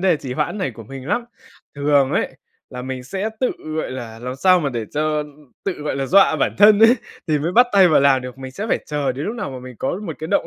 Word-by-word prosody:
đề 180 -4 +3
trì 130 -3 -6
hoãn 205 - -2
này 185 -8 -1
của 115 -1 -12
mình 135 +3 -9
lắm. 235 +4 0 0.5
Thường 140 -1 +2
ấy, - - -1 0.3
là 125 - -7
mình 130 -1 -5
sẽ 195 +8 -3
tự, 255 - +2 0.3
gọi 155 - -2
là, 115 -3 -7
làm 125 +2 -6
sao 185 +3 +4
mà 145 - 0
để 115 -2 -3
cho 150 0 0 0.4
tự, 195 - 0
gọi 150 -3 -4
là, 135 -1 -2
dọa 195 +5 +5
bản - - 0
thân 210 0 +7
ấy, 225 +2 +7 0.3
thì 155 -2 +1
mới 165 +5 -2
bắt 245 +3 +6
tay 195 -2 +6
vào 155 - +4
làm 135 -2 +4
được, 125 0 -8
mình 130 -1 -8
sẽ 210 +7 -5
phải - - +2
chờ 145 -3 -1
đến 140 +4 -5
lúc 220 - -3
nào 235 - -4
mà 130 - -7
mình 130 -1 -10
có 175 +8 -2
một - - -3
cái 160 - -5
động 200 - +1
145 Hz, 270 wpm, -20 LUFS, 130-190 Hz, 0.5 s, thân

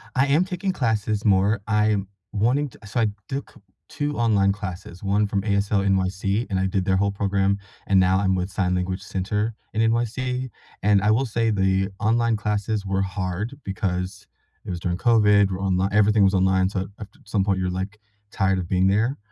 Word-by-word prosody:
I 135 +2 +3
am 155 +6 +3
taking 185 +1 -2
classes 110 - -1
more, 100 +1 +3
I'm 105 -2 +1 0.2
wanting 125 +7 +1
to - - -19
So 120 +4 -2
I 110 - +3 0.2
took 135 +1 -5 0.4
2 145 0 -3
online 105 -4 +3
classes, 95 -3 -7
1 100 +2 +2
from 100 -1 -1
ASL 100 -1 +1
NYC, 95 +3 0
and 95 -1 0
I 95 - +1
did 95 -1 -1
their 95 -1 +2
whole 100 +1 +1
program. 100 0 0 0.3
And 95 -1 +4
now 95 +1 +4
I'm 95 -1 +1
with 90 +1 -2
Sign 90 -2 0
Language 90 +1 -2
Center 105 +4 -2 0.2
in 110 - +1
NYC. 125 +3 0 0.3
And 100 -1 +4
I 105 - +2
will 130 +5 +2
say 115 -1 0
the 95 -1 +1
online 115 +1 +2
classes 105 0 -2
were 95 0 0
hard 95 +6 -3
because 95 -2 -3 0.4
it - - -8
was 90 -1 -3
during 90 0 -2
COVID, 105 -3 +4
we're 95 - -3
onli 95 0 +1
everything 105 0 +4
was 95 +1 +4
online, 95 0 +3
so 95 -1 -3
after 105 - -11
some 100 -2 0
point, 100 -2 +1
you're, 90 -1 -1
like, 95 +3 -4 0.3
tired 95 -1 +1
of 85 - -4
being 95 0 +2
there. 110 +8 +1
100 Hz, 195 wpm, -23 LUFS, 95-110 Hz, 0.4 s, And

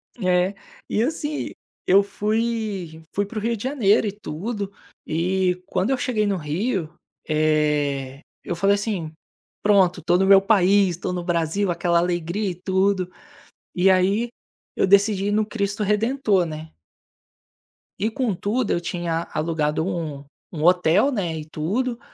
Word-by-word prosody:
É, 185 -2 +1 0.3
e 215 - +1
assim, 295 +2 -3 0.3
eu 195 +2 +6
fui 210 -5 -2
fui 205 - 0
para 215 +3 -9
o - - -1
Rio 230 +2 0
de 205 - -8
Janeiro 230 -6 +2
e - - -1
tudo, 200 +2 -5 0.3
e 180 +2 0
quando 190 +3 0
eu 265 - +2
cheguei 245 -5 0
no 200 -2 0
Rio, 170 +2 -2 0.3
eh, 150 -3 0 0.2
eu 175 - -3
falei 195 +3 +3
assim: 200 -6 -3 0.5
"Pronto, 190 -4 +3
tô 175 - +3
no 190 - +2
meu 195 0 +8
país, 195 -1 +4
estou 180 - -3
no 175 -1 -3
Brasil." 175 +3 0
Aquela 170 0 +1
alegria 175 +3 -1
e - - -7
tudo, 190 0 0 0.6
e 185 +1 +4
aí, 195 +6 +2 0.5
eu - - +2
decidi 200 0 +4
ir - - +1
no 215 +1 +2
Cristo 205 -1 -2
Redentor, 210 -1 +1
né. 155 0 -7 1.3
E, 215 +2 0
com 235 -5 -1
tudo, 210 +5 -1
eu - - +1
tinha 170 -1 -3
alugado 155 -1 0
um 160 -6 -4 0.3
um 155 -3 -4
hotel, 180 - +4
né, 180 -10 -2
e 155 - -6
tudo. 220 +11 -2
190 Hz, 150 wpm, -23 LUFS, 170-210 Hz, 1.3 s, meu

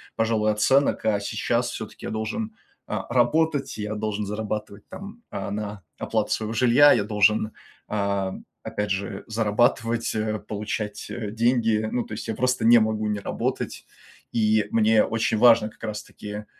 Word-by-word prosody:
пожалуй, 110 -1 +1
оценок. 135 +7 +2
А 105 -2 +2
сейчас 100 - -1
все-таки - - -8
я - - -3
должен, 215 - -3 0.3
а, 105 -1 -3
работать, 145 +4 +2
я 105 0 -3
должен 105 -1 -2
зарабатывать, 105 0 -5
там, 200 +5 -9
а, 100 0 -5
на 105 -1 -5
оплату - - -1
своего 110 0 -1
жилья. 125 +5 +6
Я 110 - +2
должен, 105 +1 +2 0.4
а, 100 -2 -1 0.3
опять 105 0 -3
же 100 0 -3
зарабатывать, 115 +1 +1
э, 110 0 -1
получать, 105 0 -5
э, 110 -4 -5
деньги. 115 -1 +2
Ну, 125 - 0
то - - -8
есть 105 - -6
я 110 - -1
просто 125 0 0
не 120 +1 +8
могу 110 -1 0
не 105 -1 -1
работать, - - -3 0.5
и 110 -2 +2
мне 110 -1 +4
очень 115 0 0
важно 115 -1 +6
как - - -20
раз 110 -1 -3
таки, 105 0 -8
110 Hz, 160 wpm, -25 LUFS, 105-115 Hz, 0.5 s, не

